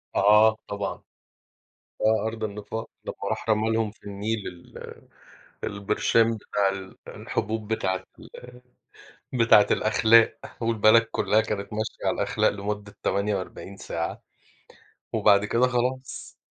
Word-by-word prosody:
آه، 105 Hz, +2 st, +5 dB
طبعًا. 100 Hz, 0 st, -4 dB, 1.0 s
آه، 110 Hz, 0 st, +2 dB
أرض 110 Hz, 0 st, -5 dB
النفاق، 105 Hz, +1 st, -5 dB, 0.2 s
لمّا -, -, -5 dB
راح -, -, -4 dB
رمى 110 Hz, +1 st, +2 dB
لهم 110 Hz, -2 st, 0 dB
في -, -, -29 dB
النيل 105 Hz, +1 st, -3 dB
ال 90 Hz, -1 st, -11 dB, 0.6 s
البرشام 115 Hz, +3 st, +1 dB
بتاع 100 Hz, -1 st, 0 dB
ال 95 Hz, -1 st, -7 dB
الحبوب 110 Hz, +1 st, -3 dB
بتاعة 95 Hz, -3 st, -1 dB, 0.2 s
ال -, -, -13 dB, 1.0 s
بتاعة 115 Hz, -4 st, +5 dB
الأخلاق، 115 Hz, +1 st, +4 dB, 0.2 s
والبلد 115 Hz, 0 st, +5 dB
كلّها 110 Hz, +1 st, +2 dB
كانت 105 Hz, -1 st, -4 dB
ماشية 110 Hz, +1 st, -4 dB
على -, -, +1 dB
الأخلاق -, -, +1 dB
لمدة 100 Hz, 0 st, -5 dB
48 100 Hz, -1 st, -2 dB
ساعة، -, -, -4 dB, 0.9 s
وبعد 100 Hz, 0 st, +4 dB
كده 120 Hz, +4 st, +2 dB
خلاص. 125 Hz, +1 st, -3 dB
110 Hz, 115 wpm, -25 LUFS, 100-115 Hz, 1.0 s, آه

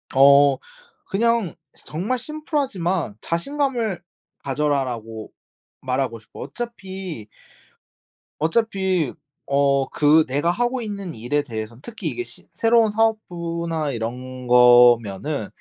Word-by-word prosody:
어. 140 Hz, 0 st, +7 dB, 0.5 s
그냥 230 Hz, -2 st, +1 dB, 0.3 s
정말 200 Hz, +11 st, -2 dB
심플하지만 235 Hz, -, -2 dB
"자신감을 235 Hz, -, -1 dB, 0.4 s
가져라."라고 130 Hz, -6 st, -2 dB, 0.5 s
말하고 130 Hz, -2 st, -2 dB
싶어 110 Hz, -, -15 dB
어차피, 190 Hz, -, -7 dB, 1.1 s
어차피 190 Hz, -, 0 dB, 0.3 s
어 140 Hz, -1 st, +2 dB
그 155 Hz, +1 st, +4 dB
내가 145 Hz, +6 st, +1 dB
하고 245 Hz, +6 st, -1 dB
있는 200 Hz, -, -5 dB
일에 120 Hz, +6 st, -1 dB
대해서 110 Hz, -3 st, -6 dB
특히 230 Hz, +7 st, -6 dB
이게 365 Hz, -, -4 dB
시 -, -, -11 dB
새로운 230 Hz, -1 st, +4 dB
사업부나 170 Hz, -8 st, -1 dB
이런 125 Hz, +2 st, -5 dB
거면은 120 Hz, 0 st, +5 dB
160 Hz, 230 characters per minute, -22 LUFS, 130-215 Hz, 1.1 s, 어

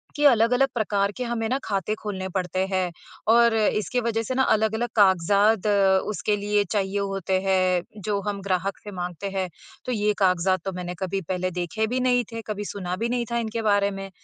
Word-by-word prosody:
कि 295 Hz, -, -1 dB
अलग-अलग 250 Hz, 0 st, +5 dB
प्रकार 205 Hz, -3 st, 0 dB
के 255 Hz, -, -2 dB
हमें 235 Hz, -2 st, -2 dB
ना 260 Hz, -, +1 dB
खाते 200 Hz, 0 st, -1 dB
खोलने 190 Hz, -3 st, -4 dB
पड़ते 185 Hz, 0 st, 0 dB
हैं 185 Hz, -2 st, 0 dB, 0.4 s
और 235 Hz, 0 st, +5 dB
इसकी 215 Hz, +1 st, +1 dB
वजह 225 Hz, -1 st, -1 dB
से 255 Hz, -, -3 dB
ना 265 Hz, -, +3 dB
अलग-अलग 220 Hz, +1 st, +1 dB
कागज़ात 200 Hz, +2 st, +4 dB, 0.4 s
उसके 210 Hz, 0 st, 0 dB
लिए 205 Hz, 0 st, +1 dB
चाहिए 200 Hz, -1 st, 0 dB
होते 195 Hz, -1 st, -1 dB
हैं, 185 Hz, -2 st, +2 dB, 0.2 s
जो 205 Hz, +1 st, -1 dB
हम 200 Hz, -1 st, -2 dB
ग्राहक 190 Hz, 0 st, -1 dB
से 205 Hz, -, -8 dB
माँगते 180 Hz, +1 st, -5 dB
हैं। 190 Hz, -1 st, -2 dB, 0.4 s
तो 255 Hz, -, -2 dB
ये 210 Hz, -2 st, +1 dB
कागज़ात 185 Hz, -1 st, +2 dB
तो 195 Hz, -, -1 dB
मैंने 180 Hz, 0 st, -5 dB
कभी 195 Hz, 0 st, -2 dB
पहले 185 Hz, 0 st, -1 dB
देखे 180 Hz, +5 st, -2 dB
भी 250 Hz, +3 st, -1 dB
नहीं 250 Hz, -1 st, +2 dB
थे, 230 Hz, 0 st, -5 dB
कभी 210 Hz, -1 st, -4 dB
सुना 180 Hz, -3 st, -4 dB
भी 230 Hz, +5 st, -2 dB
नहीं 240 Hz, -1 st, -1 dB
था 235 Hz, -, 0 dB
इनके 230 Hz, 0 st, -2 dB
बारे 205 Hz, -2 st, +2 dB
में, 195 Hz, 0 st, -6 dB
205 Hz, 200 wpm, -25 LUFS, 190-225 Hz, 0.4 s, अलग-अलग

